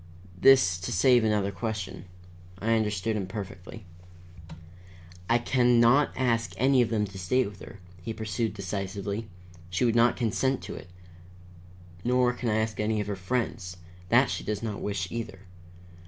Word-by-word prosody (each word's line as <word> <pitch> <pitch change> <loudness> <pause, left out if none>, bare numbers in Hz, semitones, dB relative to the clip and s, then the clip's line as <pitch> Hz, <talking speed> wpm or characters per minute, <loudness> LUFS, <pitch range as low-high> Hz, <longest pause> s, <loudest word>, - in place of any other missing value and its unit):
This 95 -4 +5
to 95 - -5
save 120 +6 +4
another 105 -2 +1
question. 100 -3 -5 0.5
I 110 +4 0
understood 110 -1 0
him 100 -3 -2
perfectly. 95 +1 -8 1.4
"I 120 - +5
can 120 0 +3
not 120 +5 +5
ask 115 -3 0
any 130 +1 +4
of 120 - +1
them 105 -2 +1
to 95 -1 -9
stay 125 +8 +1
with 100 -2 -9
her," 100 - -11 0.2
he 115 - -5
pursued 110 0 -3
decisively. 100 +2 -4 0.4
"She 90 +6 0
would 115 - +3
not 120 +1 +4
consent 130 +3 0
to - - -6
it. 90 - -10 1.1
Nor 125 0 +2
can 125 -1 -3
I 105 - +1
ask 110 0 -1
any 105 0 0
of 105 - -1
her 100 0 -3
friends. 95 -2 -3 0.3
That - - +4
she - - -3
does 105 +1 -3
not 105 -3 -4
wish, 100 -3 -2
either. 110 -5 -5
110 Hz, 160 wpm, -27 LUFS, 100-120 Hz, 1.4 s, This